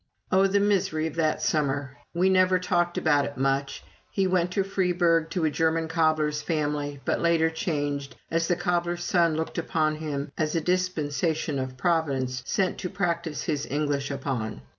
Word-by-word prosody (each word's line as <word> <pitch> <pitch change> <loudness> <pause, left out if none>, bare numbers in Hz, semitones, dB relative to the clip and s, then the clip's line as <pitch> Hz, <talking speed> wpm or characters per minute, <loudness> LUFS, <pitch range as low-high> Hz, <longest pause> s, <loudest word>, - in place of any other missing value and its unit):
Oh, 190 +1 +5
the 200 +1 +2
misery 195 -6 +1
of 160 - -3
that 155 -2 +1
summer! 140 -3 0 0.2
We 175 +2 +2
never 185 -1 +4
talked 175 -1 0
about 145 -3 +3
it 140 - -7
much. 135 +1 -1 0.3
He 195 - 0
went 180 -1 +2
to 195 - +2
Freiburg, 175 -4 +1
to 175 -2 -1
a 155 - +2
German 160 +1 +1
cobbler's 155 -2 +1
family, 150 -3 -2
but - - 0
later 165 -1 +3
changed, 145 -4 -2 0.2
as 165 0 +1
the 175 - +2
cobbler's 175 0 -1
son 170 -2 +2
looked 160 +2 -2
upon 155 -3 0
him 145 -2 -4
as 155 0 0
a 165 - +1
dispensation 160 -4 0
of 130 0 -4
Providence, 135 -5 0
sent 190 -2 0
to 180 - -3
practise 170 -5 -2
his 150 -4 -2
English 145 -1 -1
upon. 130 - -3
160 Hz, 170 wpm, -26 LUFS, 145-175 Hz, 0.3 s, Oh